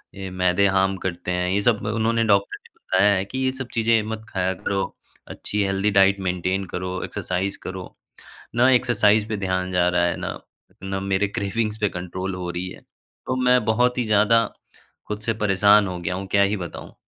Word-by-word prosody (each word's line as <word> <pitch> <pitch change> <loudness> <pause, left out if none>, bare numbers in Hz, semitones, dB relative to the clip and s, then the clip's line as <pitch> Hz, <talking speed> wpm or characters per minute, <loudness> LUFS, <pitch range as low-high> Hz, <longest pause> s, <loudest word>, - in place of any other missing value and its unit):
ये 95 -1 -6
मैदे 90 +1 +2
हार्म 95 0 +2
करते 90 -1 -4
हैं 90 0 0
ये 100 +2 +1
सब 110 -2 +1
अ, - - 0
उन्होंने 115 +1 +1
डॉक्टर 100 -2 +2
ने - - -19
बताया 100 +2 +2
है 95 - -1
कि 130 - -7
ये 130 0 +1
सब 130 -1 -6
चीज़ें 115 -1 +3
मत 110 0 -6
खाया 95 0 -1
करो। 95 +1 -2 0.5
अच्छी 105 -1 -2
हेल्दी 95 +2 +1
डाइट 100 0 +4
मेंटेन 90 +2 -1
करो 90 0 -3
एक्सरसाइज़ 95 +2 -3
करो। 95 -1 -7 0.6
न 125 +2 +5
एक्सरसाइज़ 110 -4 +3
पे 110 - -2
ध्यान 95 -1 -2
जा 90 -1 +3
रहा 90 0 +2
है, 85 - 0
ना - - -5 0.4
ना 95 0 -3
मेरे 100 +1 0
क्रेविंग्स 105 +2 -2
पे 105 - +2
कंट्रोल 90 +1 -5
हो 90 -1 -4
रही 90 +1 -4
है, - - -12
तो 130 - -8
मैं 125 -2 +4
बहुत 125 +3 +2
ही 120 - +1
ज़्यादा 110 +2 +4 0.6
खुद 105 0 -4
से 115 0 -1
परेशान 100 0 +4
हो 90 -1 -5
गया 85 +1 -3
हूँ, 95 +1 -5
क्या 100 +1 +3
ही 100 +2 +2
बताऊँ। 85 -1 -8
100 Hz, 200 wpm, -23 LUFS, 95-110 Hz, 0.6 s, न